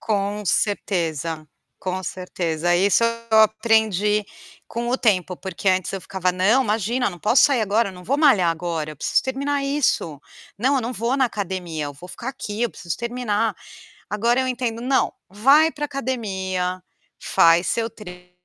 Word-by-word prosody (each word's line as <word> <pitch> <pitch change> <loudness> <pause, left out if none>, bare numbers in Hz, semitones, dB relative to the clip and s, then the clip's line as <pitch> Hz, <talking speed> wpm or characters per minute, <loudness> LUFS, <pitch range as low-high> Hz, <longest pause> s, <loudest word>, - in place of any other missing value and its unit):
Com 205 -1 -1
certeza, 165 -6 -1 0.3
com 185 0 -3
certeza. 175 -2 -2
Isso 200 +5 +3 0.3
eu 220 - +5
aprendi 215 -2 +2 0.4
com 235 +1 -4
o 255 - +1
tempo 185 -5 +1
porque 190 +1 -3
antes 185 0 +1
eu 195 - -4
ficava: 185 +1 -1
"Não, 205 +9 +3
imagina, 225 +2 0
não 175 - -11
posso 215 - +4
sair 275 -5 +3
agora, 215 +1 +1
eu - - -13
não 180 0 -12
vou 275 - +1
malhar 215 - +5
agora, 165 -2 -3
eu 150 - -10
preciso - - +1
terminar 280 +2 -2
isso. 275 - 0 0.4
Não, 265 +5 +2
eu - - +1
não 240 +1 -3
vou 235 +3 -1
na 270 - +3
academia, 185 -7 -4
eu 145 - -6
vou 160 +6 -13
ficar 240 - -7
aqui, 230 -5 -5
eu 240 - +1
preciso 170 - -5
terminar". 235 -3 -1 0.6
Agora 235 +5 +1
eu 260 - -1
entendo, 240 -2 -2
"Não, 260 +2 +1 0.2
vai 275 +11 +4
para 295 - -4
academia, 190 -10 -3 0.4
faz 170 +2 +4
seu 230 0 0
treino 180 -4 -12
210 Hz, 170 wpm, -22 LUFS, 180-240 Hz, 0.6 s, eu